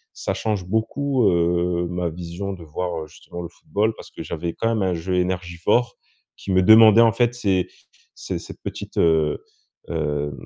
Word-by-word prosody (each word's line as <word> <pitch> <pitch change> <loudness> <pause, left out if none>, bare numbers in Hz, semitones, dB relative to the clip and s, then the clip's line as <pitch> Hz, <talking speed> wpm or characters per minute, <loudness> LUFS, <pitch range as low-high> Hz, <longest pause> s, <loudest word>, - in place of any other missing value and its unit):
ça - - -2
change 105 -4 -2
beaucoup, 120 +4 +1
heu, 85 0 +1
ma 90 -1 -2
vision 90 +4 -6
de 90 -3 -10
voir, 80 +1 -4
heu, - - -10
justement 85 +3 -10
le 85 - -6
football. 105 +5 -1
Parce - - -12
que - - -9
j'avais 85 +1 -4
quand 115 - -2
même 105 - 0
un 90 - 0
jeu 90 +2 -2
énergivore, 90 +5 0 0.4
qui 100 - -5
me 95 0 +4
demandait 110 +2 +8
en 115 -1 +6
fait, 120 0 +2
ces 95 -6 +1 0.5
ces - - -4
cette - - -11
petite, - - -7
heu 80 -2 +2 0.5
heu. 75 -3 -2
90 Hz, 180 wpm, -22 LUFS, 85-105 Hz, 0.5 s, demandait